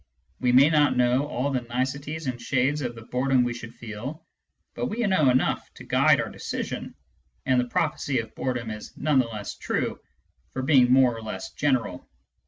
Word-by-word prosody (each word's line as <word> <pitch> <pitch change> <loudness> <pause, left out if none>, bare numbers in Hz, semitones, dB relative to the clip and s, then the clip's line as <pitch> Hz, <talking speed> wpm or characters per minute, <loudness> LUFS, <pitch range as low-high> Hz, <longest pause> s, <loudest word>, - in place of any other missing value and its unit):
We 125 -1 +2
may 130 +3 +7
not 150 -4 +3
know 125 +3 +3
all 140 0 -1
the 130 -2 0
niceties 140 +6 -3
and 125 -2 -3
shades 135 +3 +1
of 120 -3 -3
the 115 - -10
boredom 125 +2 +2
we 120 -1 -1
should 120 -1 -9
feel, 120 +9 -7 0.5
but - - -2
we 215 - -4
know 185 -9 +4
enough 125 +1 +1
to - - -11
guide - - +4
our - - -2
decision, - - -5 0.5
and 130 -1 +3
the - - -2
prophecy 145 -2 0
of 115 -1 -3
bore 130 -1 -2
dom 120 -2 -4
is 105 0 -9
none 150 -2 +2
the 125 - +2
less 105 -3 -6
true - - -2 0.5
for 130 - -3
being 130 -3 +5
more 130 -2 +5
or 115 - -7
less 105 -4 -6
general. 130 -10 -1
130 Hz, 190 wpm, -26 LUFS, 120-140 Hz, 0.5 s, may